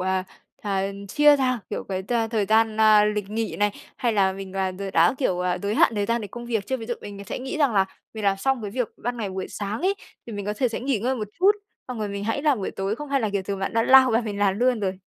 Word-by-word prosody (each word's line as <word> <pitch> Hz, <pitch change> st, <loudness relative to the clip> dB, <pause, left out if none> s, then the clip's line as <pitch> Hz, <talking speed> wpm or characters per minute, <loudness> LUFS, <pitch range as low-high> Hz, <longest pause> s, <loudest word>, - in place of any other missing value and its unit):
à, 185 Hz, 0 st, 0 dB, 0.4 s
à, 195 Hz, -2 st, 0 dB, 0.3 s
chia 295 Hz, +6 st, +6 dB
ra, 255 Hz, -2 st, +1 dB
kiểu, -, -, -3 dB
cái 190 Hz, -1 st, -3 dB
t 220 Hz, -, -5 dB, 0.2 s
thời 220 Hz, -3 st, +1 dB
gian, 220 Hz, 0 st, +3 dB
a, 215 Hz, -1 st, +7 dB
lịch 210 Hz, -1 st, -1 dB
nghỉ 225 Hz, +1 st, -2 dB
này, 205 Hz, 0 st, +2 dB, 0.3 s
hay 235 Hz, -2 st, 0 dB
là 195 Hz, -2 st, +3 dB
mình, 195 Hz, 0 st, -8 dB
à, 190 Hz, -1 st, 0 dB
đ 185 Hz, +2 st, -8 dB
đã, 165 Hz, +7 st, +4 dB
kiểu, 185 Hz, -10 st, 0 dB, 0.2 s
giới 205 Hz, +2 st, -1 dB
hạn 230 Hz, -, +4 dB
thời 205 Hz, -1 st, 0 dB
gian 235 Hz, 0 st, +1 dB
để 210 Hz, -, -5 dB
công 240 Hz, +3 st, -8 dB
việc 220 Hz, -4 st, -1 dB
chưa? 260 Hz, -, -1 dB
Ví 225 Hz, -3 st, -8 dB
dụ 240 Hz, -, -2 dB
mình 200 Hz, -1 st, -8 dB
sẽ -, -, -5 dB
nghĩ 260 Hz, +3 st, -5 dB
rằng 285 Hz, -5 st, +3 dB
là 195 Hz, -1 st, +4 dB, 0.3 s
mình 215 Hz, -2 st, -5 dB
làm 195 Hz, -1 st, +3 dB
xong 255 Hz, +4 st, 0 dB
cái 205 Hz, -, -4 dB
việc 245 Hz, +1 st, -1 dB
ban 245 Hz, +1 st, -3 dB
ngày 210 Hz, -4 st, -3 dB
buổi 190 Hz, 0 st, -4 dB
sáng 205 Hz, +1 st, -4 dB
ấy 380 Hz, +3 st, +2 dB, 0.3 s
thì 235 Hz, -, -7 dB
mình 205 Hz, -1 st, -5 dB
có 210 Hz, -, 0 dB
thể 255 Hz, -3 st, +2 dB
sẽ 225 Hz, -, -4 dB
nghỉ 260 Hz, -2 st, 0 dB
ngơi 250 Hz, +6 st, 0 dB
một 215 Hz, -3 st, -4 dB
chút, 380 Hz, +3 st, +6 dB, 0.4 s
xong 250 Hz, -2 st, -5 dB
rồi 210 Hz, -1 st, -2 dB
mình 200 Hz, 0 st, -4 dB
hãy 225 Hz, +6 st, -1 dB
làm 295 Hz, -5 st, +3 dB
buổi 195 Hz, -, -3 dB
tối 195 Hz, +3 st, -2 dB
không 295 Hz, +2 st, -7 dB
hay 275 Hz, -1 st, +1 dB
là, 220 Hz, -3 st, 0 dB
kiểu, 200 Hz, -1 st, -1 dB
thường 195 Hz, +1 st, -4 dB
bạn 195 Hz, -, -2 dB
đã 225 Hz, -, +2 dB
lao 260 Hz, +1 st, +7 dB
vào 230 Hz, +1 st, +2 dB
mình 210 Hz, -3 st, -4 dB
làm 200 Hz, -1 st, +2 dB
luôn 245 Hz, -1 st, +2 dB
rồi? 190 Hz, -2 st, -2 dB
215 Hz, 295 wpm, -24 LUFS, 200-245 Hz, 0.4 s, a